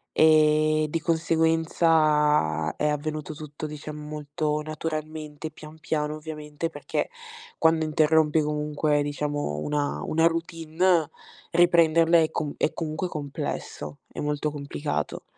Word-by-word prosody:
E 155 Hz, 0 st, +4 dB
di 165 Hz, -, 0 dB
conseguenza, 160 Hz, -, +2 dB
è 150 Hz, -, 0 dB
avvenuto 155 Hz, +1 st, -3 dB
tutto, 150 Hz, 0 st, -8 dB
diciamo, 150 Hz, 0 st, -7 dB
molto 150 Hz, 0 st, -2 dB
naturalmente, 155 Hz, 0 st, -5 dB
pian 155 Hz, +1 st, -13 dB
piano 150 Hz, -1 st, -2 dB
ovviamente, 150 Hz, +1 st, -5 dB
perché, 145 Hz, -3 st, -3 dB, 0.5 s
quando 160 Hz, 0 st, +3 dB
interrompi 155 Hz, 0 st, +3 dB
comunque 150 Hz, 0 st, 0 dB
diciamo 145 Hz, -, -2 dB
una 145 Hz, -1 st, -1 dB
una 165 Hz, +1 st, +3 dB
routine, 165 Hz, 0 st, +1 dB, 0.4 s
riprenderla 170 Hz, -1 st, +5 dB
è 160 Hz, -1 st, +2 dB
comu 145 Hz, -2 st, -3 dB
è -, -, +1 dB
comunque 160 Hz, +2 st, -3 dB
complesso, 140 Hz, -, -5 dB
è -, -, -8 dB
molto 150 Hz, 0 st, -1 dB
complicato. 145 Hz, 0 st, -4 dB
155 Hz, 115 wpm, -26 LUFS, 150-160 Hz, 0.5 s, riprenderla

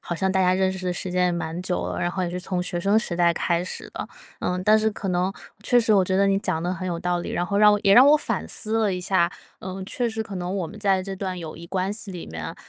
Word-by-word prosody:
好 175 Hz, -, -4 dB
像 190 Hz, +3 st, 0 dB
大 190 Hz, 0 st, +1 dB
家 180 Hz, 0 st, +3 dB
认 190 Hz, 0 st, +1 dB
识 185 Hz, -1 st, -6 dB
的 180 Hz, -, 0 dB
时 180 Hz, +1 st, -4 dB
间 180 Hz, 0 st, +2 dB
也 180 Hz, -, +1 dB
蛮 170 Hz, 0 st, -3 dB
久 180 Hz, 0 st, -2 dB
了， -, -, -4 dB
然 175 Hz, -, 0 dB
后 185 Hz, 0 st, -3 dB
也 175 Hz, -, -2 dB
是 180 Hz, +1 st, -4 dB
从 180 Hz, -1 st, -1 dB
学 175 Hz, -1 st, -2 dB
生 200 Hz, +4 st, +3 dB
时 205 Hz, -6 st, -1 dB
代 170 Hz, 0 st, +3 dB
开 170 Hz, +1 st, 0 dB
始 185 Hz, -, -6 dB
的。 -, -, -6 dB, 0.3 s
呃， 180 Hz, 0 st, -1 dB
但 215 Hz, +2 st, +6 dB
是 220 Hz, -, +2 dB
可 200 Hz, -2 st, -5 dB
能 180 Hz, +1 st, +1 dB, 0.3 s
确 245 Hz, +2 st, +4 dB
实 225 Hz, -2 st, +3 dB
我 195 Hz, -, +5 dB
觉 185 Hz, +1 st, 0 dB
得 200 Hz, -, +4 dB
你 195 Hz, 0 st, +2 dB
讲 160 Hz, -5 st, -2 dB
得 180 Hz, +1 st, -1 dB
很 185 Hz, 0 st, -5 dB
有 170 Hz, -1 st, -2 dB
道 175 Hz, 0 st, -1 dB
理， -, -, -5 dB
然 175 Hz, -, 0 dB
后 200 Hz, +2 st, -1 dB
让 210 Hz, 0 st, +7 dB
我 205 Hz, -, +2 dB
也 195 Hz, -, +5 dB
让 255 Hz, +5 st, +8 dB
我 300 Hz, +1 st, +7 dB
反 -, -, -2 dB
思 220 Hz, +1 st, -2 dB
了 205 Hz, -4 st, +1 dB
一 -, -, -3 dB
下， 180 Hz, -1 st, +2 dB, 0.3 s
呃， 190 Hz, +1 st, -6 dB
确 240 Hz, +4 st, -1 dB
实 220 Hz, 0 st, -3 dB
可 195 Hz, -3 st, -7 dB
能 180 Hz, +2 st, -3 dB
我 180 Hz, -4 st, -2 dB
们 210 Hz, -, -11 dB
在 195 Hz, -3 st, +2 dB
这 195 Hz, +1 st, -5 dB
段 190 Hz, -1 st, -4 dB
友 160 Hz, -2 st, -7 dB
谊 170 Hz, +1 st, -10 dB
关 190 Hz, +2 st, -1 dB
系 210 Hz, -2 st, -6 dB
里 180 Hz, -2 st, -7 dB
面， 80 Hz, 0 st, -6 dB
185 Hz, 330 characters per minute, -24 LUFS, 175-200 Hz, 0.3 s, 让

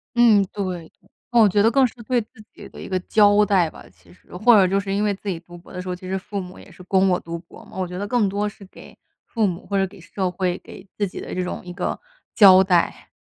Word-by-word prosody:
嗯， 230 Hz, -4 st, +5 dB
对， 205 Hz, -, -3 dB, 0.3 s
对。 -, -, -32 dB, 0.2 s
嗯， 240 Hz, -1 st, +5 dB
我 215 Hz, -, +6 dB
觉 205 Hz, +2 st, +2 dB
得 225 Hz, -, +4 dB
更 270 Hz, +2 st, +4 dB
是 -, -, -14 dB
对 245 Hz, +1 st, 0 dB
自 215 Hz, -, -13 dB, 0.3 s
己 -, -, -12 dB
的 -, -, -13 dB
一 -, -, -8 dB
个 185 Hz, -1 st, -1 dB
交 205 Hz, +1 st, +4 dB
代 190 Hz, -4 st, +2 dB
吧 -, -, -14 dB
其 85 Hz, -1 st, -22 dB
实， 90 Hz, -, -17 dB
或 215 Hz, +6 st, +5 dB
者 195 Hz, -3 st, +5 dB
就 195 Hz, +2 st, +1 dB
是 195 Hz, 0 st, -4 dB
因 205 Hz, +1 st, 0 dB
为 210 Hz, -, +1 dB
自 200 Hz, -, -13 dB
己 180 Hz, -4 st, -2 dB
读 175 Hz, +1 st, -14 dB
博 170 Hz, -, -16 dB
的 180 Hz, -, -5 dB
时 185 Hz, -, -10 dB
候， 180 Hz, -, -2 dB
其 185 Hz, +1 st, -11 dB
实 190 Hz, -, -2 dB
父 200 Hz, +1 st, -6 dB
母 180 Hz, 0 st, -9 dB
也 -, -, -15 dB
是 180 Hz, -, -14 dB
供 190 Hz, +1 st, +2 dB
我 180 Hz, -, +1 dB
读 170 Hz, 0 st, -7 dB
博 170 Hz, -, -16 dB
嘛， -, -, -16 dB
我 185 Hz, -1 st, -2 dB
觉 180 Hz, +1 st, -7 dB
得 205 Hz, +2 st, -4 dB
更 225 Hz, -3 st, +1 dB
多 205 Hz, +2 st, -1 dB
是 210 Hz, -1 st, -10 dB
给 185 Hz, -, -15 dB, 0.3 s
父 225 Hz, -3 st, 0 dB
母， 180 Hz, -1 st, -5 dB
或 200 Hz, -, -4 dB
者 195 Hz, -, +2 dB
给 190 Hz, -, -16 dB
社 185 Hz, +2 st, -3 dB
会、 180 Hz, 0 st, -2 dB
给 190 Hz, -, -13 dB
自 205 Hz, -, 0 dB
己 180 Hz, -, -9 dB
的 -, -, -7 dB
这 185 Hz, -, -2 dB
种 180 Hz, -, -5 dB
一 180 Hz, -, -8 dB
个 180 Hz, 0 st, -3 dB, 0.4 s
交 190 Hz, -3 st, +8 dB
代。 180 Hz, -3 st, 0 dB
190 Hz, 310 characters per minute, -22 LUFS, 180-205 Hz, 0.4 s, 交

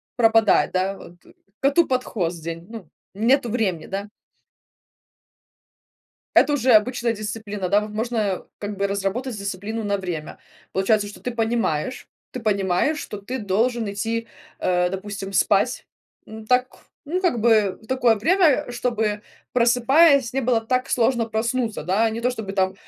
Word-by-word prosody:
пропадает, 225 Hz, -2 st, +4 dB
да, 190 Hz, +1 st, 0 dB
вот, 175 Hz, -, -13 dB, 0.4 s
коту 285 Hz, +5 st, +3 dB
под 255 Hz, -1 st, 0 dB
хвост 170 Hz, -7 st, -3 dB
день, 165 Hz, +1 st, -6 dB
ну, 225 Hz, -7 st, -9 dB, 0.3 s
нету 240 Hz, +4 st, +2 dB
времени, 200 Hz, -8 st, -1 dB
да. 195 Hz, +1 st, -4 dB, 2.3 s
Это 295 Hz, -, +5 dB
уже 260 Hz, -3 st, +3 dB
обычная 235 Hz, +2 st, +3 dB
дисциплина, 210 Hz, -3 st, -5 dB
да, 200 Hz, +3 st, +4 dB
вот 210 Hz, 0 st, -6 dB
можно, 215 Hz, -3 st, -2 dB
как 205 Hz, 0 st, -5 dB
бы, 200 Hz, +1 st, 0 dB
разработать 200 Hz, +5 st, -2 dB
дисциплину 200 Hz, +3 st, -4 dB
на 200 Hz, -1 st, 0 dB
время. 175 Hz, -5 st, -6 dB, 0.3 s
Получается, 205 Hz, +2 st, +1 dB
что 205 Hz, -, -12 dB
ты 250 Hz, -, -3 dB
понимаешь 230 Hz, -3 st, -1 dB, 0.2 s
ты 255 Hz, -, -5 dB
понимаешь, 200 Hz, -, +1 dB
что 210 Hz, -, -6 dB
ты 245 Hz, +6 st, -5 dB
должен 225 Hz, +2 st, 0 dB
идти, 230 Hz, +3 st, -3 dB, 0.3 s
э, 180 Hz, -1 st, +1 dB
допустим, 195 Hz, 0 st, -6 dB
спать, -, -, +2 dB, 0.4 s
ну 220 Hz, 0 st, -10 dB
так, 250 Hz, +3 st, +3 dB, 0.4 s
ну, 360 Hz, +5 st, -2 dB
как 295 Hz, -11 st, +1 dB
бы, 215 Hz, -4 st, +3 dB
такое 245 Hz, -3 st, +3 dB
время, 300 Hz, -, +3 dB
чтобы 225 Hz, -4 st, -1 dB, 0.3 s
просыпаясь 250 Hz, +2 st, +4 dB
не 270 Hz, -, 0 dB
было 240 Hz, -2 st, +2 dB
так 255 Hz, +3 st, -1 dB
сложно 235 Hz, 0 st, +2 dB
проснуться, 230 Hz, -, -2 dB
да, 200 Hz, +7 st, +1 dB
не 225 Hz, +1 st, -4 dB
то 245 Hz, -, +1 dB
чтобы 220 Hz, -5 st, -5 dB
там 190 Hz, -1 st, +1 dB
220 Hz, 145 wpm, -23 LUFS, 200-245 Hz, 2.3 s, Это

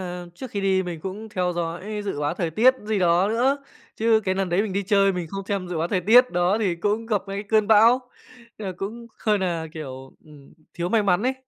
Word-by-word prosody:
là 180 Hz, -1 st, -6 dB
trước 255 Hz, +6 st, -8 dB
khi 200 Hz, -, -3 dB
đi 190 Hz, -1 st, +2 dB
mình 175 Hz, -3 st, -6 dB
cũng 200 Hz, +5 st, -6 dB
theo 180 Hz, -3 st, -1 dB
dõi 175 Hz, +5 st, -4 dB
dự 170 Hz, -7 st, -3 dB
báo 145 Hz, +3 st, -1 dB
thời 170 Hz, -3 st, -2 dB
tiết 245 Hz, +10 st, +5 dB
gì 215 Hz, -1 st, 0 dB
đó 180 Hz, +2 st, +3 dB
nữa, 250 Hz, +5 st, +2 dB, 0.4 s
chứ 220 Hz, 0 st, +3 dB
cái 185 Hz, 0 st, 0 dB
lần 190 Hz, -1 st, -1 dB
đấy 180 Hz, +4 st, +2 dB
mình 210 Hz, -4 st, -4 dB
đi 200 Hz, +1 st, -1 dB
chơi 195 Hz, 0 st, +3 dB
mình 180 Hz, -2 st, -4 dB
không 195 Hz, 0 st, -5 dB
xem 195 Hz, -3 st, -2 dB
dự 170 Hz, -3 st, -3 dB
báo 165 Hz, -, -1 dB
thời 185 Hz, -1 st, 0 dB
tiết 245 Hz, +7 st, +6 dB
đó 180 Hz, +4 st, +1 dB
thì 190 Hz, -6 st, 0 dB
cũng 210 Hz, +5 st, -1 dB
gặp 210 Hz, -3 st, 0 dB
ngay 195 Hz, -, -4 dB
cái 200 Hz, -, -3 dB
cơn 215 Hz, -2 st, +3 dB
bão, 225 Hz, +4 st, +6 dB, 0.6 s
nên 205 Hz, -3 st, -5 dB
là 185 Hz, -, -5 dB
cũng 230 Hz, +5 st, -6 dB, 0.2 s
hơi 210 Hz, -2 st, +3 dB
nà, 170 Hz, -4 st, -2 dB
kiểu, 135 Hz, -4 st, -8 dB
ừm, 150 Hz, -3 st, -16 dB, 0.2 s
thiếu 175 Hz, 0 st, -2 dB
may 220 Hz, +2 st, +2 dB
mắn 195 Hz, +1 st, +2 dB
ấy. 260 Hz, +1 st, +1 dB
195 Hz, 250 wpm, -24 LUFS, 175-215 Hz, 0.6 s, tiết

